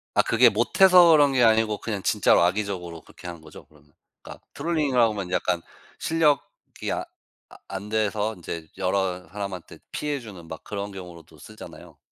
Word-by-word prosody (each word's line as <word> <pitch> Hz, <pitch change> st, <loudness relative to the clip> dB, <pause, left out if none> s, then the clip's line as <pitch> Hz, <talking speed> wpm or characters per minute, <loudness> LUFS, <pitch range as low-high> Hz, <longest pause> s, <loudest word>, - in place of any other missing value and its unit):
아 -, -, +6 dB
그게 -, -, +5 dB
못해서 180 Hz, -3 st, +5 dB
그런 145 Hz, -3 st, +5 dB
게 125 Hz, -, +3 dB
아니고 110 Hz, -2 st, +3 dB
그냥 105 Hz, -4 st, -4 dB
진짜로 105 Hz, -5 st, +3 dB
악의적으로 90 Hz, -2 st, -2 dB
그렇게 -, -, -13 dB
한 85 Hz, -2 st, -8 dB
거죠, 80 Hz, 0 st, -14 dB
그러면? 75 Hz, -1 st, -25 dB, 0.3 s
그러니까 -, -, -12 dB
트롤링이라고 140 Hz, -8 st, +1 dB
하면 95 Hz, -3 st, -5 dB
약간 90 Hz, -2 st, 0 dB, 0.4 s
실력이 160 Hz, -3 st, -1 dB
아 -, -, -1 dB, 0.5 s
아 -, -, -14 dB
안 100 Hz, +2 st, -7 dB
돼서 110 Hz, 0 st, -1 dB
인제 85 Hz, -2 st, -7 dB
여러 95 Hz, -2 st, -1 dB
사람한테 100 Hz, -1 st, -7 dB
피해 150 Hz, -1 st, -3 dB
주는 95 Hz, -9 st, -11 dB
막 80 Hz, -, -9 dB
그런 100 Hz, 0 st, -5 dB
경우로도 85 Hz, -5 st, -12 dB
쓰잖아요. 110 Hz, +8 st, -13 dB
100 Hz, 375 characters per minute, -24 LUFS, 90-115 Hz, 0.5 s, 아